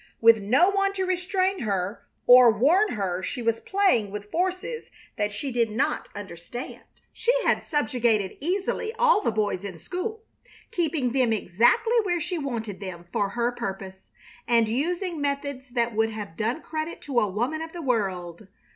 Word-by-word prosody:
With 225 -1 +6
no 265 - +4
one 395 0 +1
to 380 -1 -1
restrain 370 +1 0
her 195 -2 -2 0.2
or 245 -1 +9
warn 310 - +3
her 190 -4 -2
she 245 +6 -4
was 230 0 +1
playing 380 - +2
with 205 +1 -7
forces 370 +7 -2 0.3
that 210 -3 -1
she 260 +7 -4
did 235 -2 +1
not 225 +6 -1
understand. 200 +5 -8 0.3
She 470 - +1
had - - +2
subjugated 230 - 0
easily 385 +7 -1
all 480 -3 +4
the - - +1
boys 210 -3 -1
in 190 -4 -6
school, 380 - -5 0.5
keeping 305 -7 0
them 255 -2 +2
exactly 230 - +2
where 355 -4 0
she 345 +2 -3
wanted 230 -8 -4
them 180 -3 -7
for 200 - +1
her 235 +3 0
purpose, 190 -4 -6 0.4
and 230 -1 +4
using 335 - -1
methods 280 -2 -3
that 235 -1 0
would 225 +1 +2
have 210 -6 -7
done 235 - -2
credit 315 +1 -4
to 270 -4 0
a 210 - +2
woman 245 +11 -2
of 325 0 -6
the 345 -1 -7
world. 190 - -2
245 Hz, 165 wpm, -26 LUFS, 210-345 Hz, 0.5 s, or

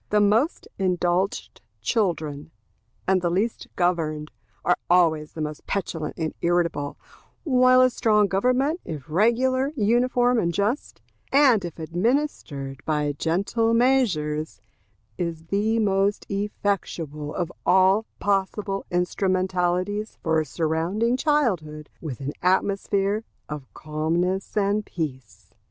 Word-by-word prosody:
The 210 - +3
most 220 - +2
indulged 180 0 0 0.2
children, 155 - -1 0.6
and 190 -1 +3
the 175 - +1
least 200 +7 -1
governed, 160 -4 0 0.3
are 180 - +4
always 160 -4 +3
the 160 - -6
most 150 0 -5
petulant 165 -6 -3
and 160 -2 -2
irritable; 170 -4 0 0.5
while 255 -3 +5
a 255 - +6
strong 210 -3 +3
government, 255 - +1
if 150 -5 -7
regular, 255 - +2
uniform, 245 +1 +2
and 170 -4 +1
just, 205 - -2 0.3
and 265 -7 +5
if 170 -2 -6
administered 165 - -2
by 150 -2 0
gentle 200 +10 0
measures, 175 -12 +1 0.6
is 165 -2 -3
the 215 +3 +1
most 200 -1 +1
effectual 190 -7 -3
of 175 -2 -2
all 190 +4 +4
possible 195 0 -1
instrumentalities 185 +2 0
for 160 -1 +2
surrounding 170 +10 0
childhood 190 - 0
with 140 -6 -6
an 140 +2 -3
atmosphere 200 +2 +1 0.2
of 150 -3 -7
calmness 170 +6 -1
and 205 +1 +2
peace. 140 - -6
185 Hz, 110 wpm, -24 LUFS, 160-215 Hz, 0.6 s, a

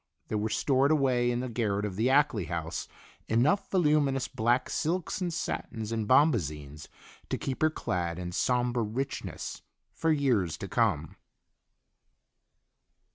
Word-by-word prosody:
There 110 - 0
were 110 +1 -1
stored 135 +3 +2
away 130 -5 +2
in 120 0 0
the 130 - -3
garret 105 -4 -1
of 100 -3 -4
the 115 +6 +1
Ackley 135 - +3
house 85 0 -4 0.4
enough 130 - +2
voluminous 150 -7 +2
black 120 +3 +1
silks 180 +3 -1
and 175 -1 -1
satins 115 -8 -4
and 110 -2 -2
bombazines 75 - +2 0.4
to - - -1
keep 135 +3 -4
her 155 - +5
clad 85 - -2
in 90 -1 -5
somber 120 +4 +1
richness 130 +6 -4 0.3
for 165 - +1
years 120 - +1
to - - -6
come. - - 0
120 Hz, 135 wpm, -29 LUFS, 105-140 Hz, 0.4 s, her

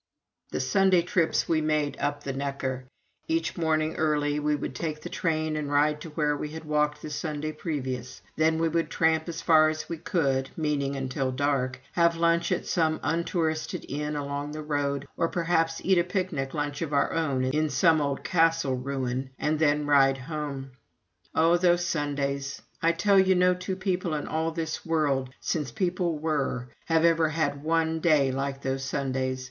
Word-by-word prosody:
The - - -3
Sunday 190 -3 +3
trips 175 -2 +1
we 160 -2 +2
made 155 -1 0
up 145 0 -2
the 135 - -3
Neckar: 135 -2 -3 0.4
each 165 0 0
morning 155 -1 0
early 150 -1 +1
we 150 0 +1
would 145 - -4
take 155 +3 -4
the - - -6
train 155 -2 -1
and 150 -2 -3
ride 150 +1 +2
to 165 - -7
where 150 -1 0
we 150 +1 -4
had 160 +1 -8
walked 150 0 0
the 155 - -6
Sunday 155 0 -3
previous; 130 -6 -4 0.2
then 160 +1 +2
we 165 0 +2
would 165 +1 0
tramp 160 0 +1
as 165 -1 -5
far 155 -2 +6
as 155 0 -4
we 165 - -5
could, 135 -7 0
meaning 145 -3 0
until 130 0 -2
dark, 130 -1 0
have 170 -1 +3
lunch 170 +1 +2
at 180 - 0
some 160 -2 +1
untouristed 160 -1 -1
inn 150 +1 -3
along 145 0 -3
the 155 0 -5
road, 145 -2 -1
or 165 - +2
perhaps 165 -1 0
eat 190 -2 +4
a - - +3
picnic 180 -7 -2
lunch 145 0 -2
of 155 -3 -3
our 140 - +2
own 140 -6 0
in 150 +4 +1
some 160 -1 +4
old 140 -1 -2
castle 165 -5 +2
ruin, 130 0 -3
and 155 0 0
then 150 -1 +2
ride 135 -2 +4
home. 140 -1 -5 0.6
Oh, 165 +2 +4
those 175 -1 +3
Sundays! 140 -3 -2 0.2
I 165 - +4
tell 195 +4 +3
you 190 0 +4
no 180 0 +4
two 180 +1 -4
people 185 -3 -1
in 145 - -3
all 160 +1 0
this 160 -1 -4
world, 145 -5 0
since 150 -5 -2
people 175 +1 -1
were, 145 -5 -1 0.2
have 165 0 +3
ever 165 -1 +4
had 145 -3 -1
one 160 0 +1
day 150 -5 +3
like 135 +1 -3
those 135 0 -2
Sundays. 130 -1 -2
155 Hz, 180 wpm, -27 LUFS, 140-165 Hz, 0.6 s, far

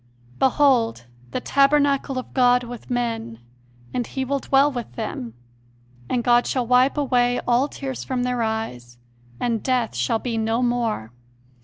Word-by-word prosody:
"Behold, 255 - +3 0.2
the - - -3
tabernacle 275 0 +2
of 255 - -6
God 250 -1 +4
with 240 -1 -9
men; 230 - -2 0.6
and 245 -2 -2
He 265 -1 -3
will 280 +1 -1
dwell 275 +2 +3
with 240 - -6
them.... 120 -1 -5 0.7
and 245 -2 0
God 240 0 +4
shall 255 -2 0
wipe 250 +4 +3
away 245 -3 +2
all 245 +3 +2
tears 270 -3 -6
from 255 -2 -2
their 250 -1 -1
eyes, 125 - -4 0.4
and 230 -3 -1
death 250 -3 0
shall 120 - +1
be 230 -1 -3
no 225 +2 0
more 235 - -1
245 Hz, 150 wpm, -23 LUFS, 225-265 Hz, 0.7 s, God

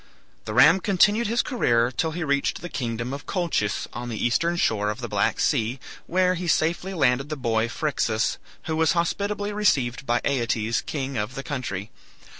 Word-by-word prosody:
The - - -4
ram 190 - +7
continued 205 +5 +3
his 235 +2 +1
career 120 - +1
till 160 +6 -1
he 170 +2 -4
reached 140 -2 0
the 175 - -6
kingdom 120 -2 -3
of 140 - -7
Colchis, 170 - -1
on 120 0 -5
the 115 - -4
eastern 170 +10 +1
shore 105 -10 +1
of 105 - -4
the - - -4
Black - - 0
Sea, 115 +4 +1 0.3
where 185 +1 +2
he 180 0 -4
safely 170 +4 0
landed 135 -2 +2
the 155 - -2
boy 115 -3 0
Phryxus, 120 -7 -1 0.2
who 160 - -2
was 160 0 +3
hospitably 205 +4 -1
received 135 - +1
by 120 0 +2
Aeetes, 115 -4 0
king 135 -3 -4
of 105 +4 -3
the 135 - -5
country. 120 -9 -4
140 Hz, 180 wpm, -24 LUFS, 120-175 Hz, 0.3 s, ram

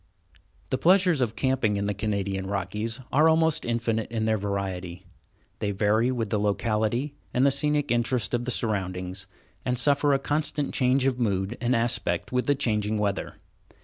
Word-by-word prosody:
The 130 - 0
pleasures 180 -4 +4
of 115 -3 0
camping 130 -6 +1
in 100 - -1
the 105 - 0
Canadian 100 -2 -2
Rockies 105 +4 -3
are 155 +4 +5
almost 160 -1 +2
infinite 115 -2 -1
in 110 -2 -1
their 110 0 +2
variety. 95 -4 -4 0.5
They 105 - -1
vary 105 +4 +2
with 115 -5 -2
the 105 - +1
locality 110 +6 0 0.2
and 125 +2 +4
the 140 - +5
scenic 145 0 +1
interest 120 0 0
of 120 0 0
the - - -3
surroundings, 95 -5 -2 0.4
and 125 0 0
suffer 145 +3 +3
a - - +4
constant 145 +1 -2
change 130 0 +2
of 130 -2 +1
mood 100 -1 0
and 125 +1 +2
aspect 115 -7 -1
with 125 0 0
the 145 - +3
changing 105 -4 0
weather. 100 -2 -2
115 Hz, 170 wpm, -26 LUFS, 100-130 Hz, 0.5 s, are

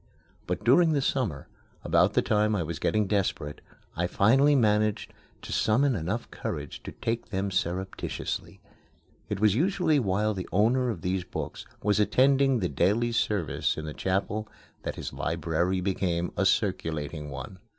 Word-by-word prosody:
But - - -2
during 160 +6 +5
the 145 - +1
summer, 105 - -1 0.4
about - - +3
the - - +2
time 105 0 +2
I 90 - 0
was 80 0 -5
getting 105 -1 +1
desperate, 95 -7 -1 0.3
I 85 +1 0
finally 135 +11 +4
managed 105 -3 +1 0.3
to - - -5
summon 130 +4 +2
enough 100 +7 -3
courage - - -5
to - - -7
take 115 +1 -3
them 95 0 -2
surreptitiously. 95 +1 -3 0.7
It - - -2
was 105 -1 +4
usually 160 - +2
while 105 -1 +1
the 95 -2 -6
owner 120 +6 +3
of 100 -8 -4
these 90 +1 -1
books - - -6 0.2
was 105 0 +2
attending 135 +4 +4
the 95 -6 0
daily 105 - +1
service 90 -11 0
in 80 - -4
the 75 - -5
chapel 100 +5 -1 0.3
that - - -4
his - - -6
library 90 +3 -1
became 90 -2 -1
a 95 - +2
circulating 80 -8 -1
one. 80 +7 -8
100 Hz, 155 wpm, -27 LUFS, 90-115 Hz, 0.7 s, during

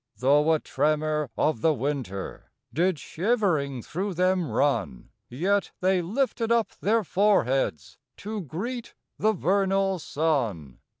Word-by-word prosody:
5 - - -23
Though 145 +4 +4
a 155 - +2
tremor 150 0 0
of 150 -8 +1
the 160 -2 +3
winter 130 -7 -4 0.2
Did 180 +2 +2
shivering 160 - 0
through 190 +2 -3
them 185 -1 +1
run; 115 - -1 0.2
Yet 190 +10 0
they 185 0 +2
lifted 230 +4 -1
up 235 -1 +2
their 220 +2 +2
foreheads 135 - +1 0.2
To 210 0 -5
greet 225 - -5 0.2
the 220 +1 +3
vernal 195 0 +1
sun. 125 - -1
165 Hz, 125 wpm, -26 LUFS, 140-195 Hz, 0.2 s, Though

